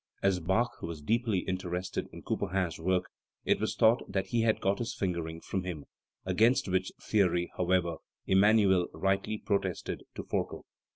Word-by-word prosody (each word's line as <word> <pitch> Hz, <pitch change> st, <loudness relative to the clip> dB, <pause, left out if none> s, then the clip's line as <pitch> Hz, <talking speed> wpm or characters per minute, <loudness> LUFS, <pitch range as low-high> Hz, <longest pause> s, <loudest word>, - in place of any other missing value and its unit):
As 95 Hz, -2 st, +3 dB
Bach 95 Hz, +8 st, 0 dB
was 85 Hz, -2 st, -5 dB
deeply 110 Hz, +4 st, +1 dB
interested 90 Hz, -1 st, -3 dB
in -, -, -10 dB
Couperin's 95 Hz, -4 st, -1 dB
work, 90 Hz, +2 st, +1 dB, 0.4 s
it -, -, +3 dB
was -, -, -1 dB
thought 110 Hz, +2 st, +5 dB
that 95 Hz, 0 st, 0 dB
he 120 Hz, -, +2 dB
had 115 Hz, -1 st, +2 dB
got 100 Hz, +1 st, +1 dB
his 120 Hz, -1 st, -3 dB
fingering 85 Hz, -3 st, -3 dB
from 95 Hz, -, -3 dB
him, 85 Hz, -6 st, -5 dB, 0.4 s
against 110 Hz, +8 st, +3 dB
which 95 Hz, 0 st, 0 dB
theory, 90 Hz, -4 st, +1 dB
however, 90 Hz, -2 st, +1 dB, 0.3 s
Emmanuel 95 Hz, -2 st, +4 dB
rightly 95 Hz, +2 st, 0 dB
protested 100 Hz, -4 st, -2 dB
to -, -, -5 dB
Forkel. -, -, -3 dB
95 Hz, 155 wpm, -30 LUFS, 90-105 Hz, 0.4 s, thought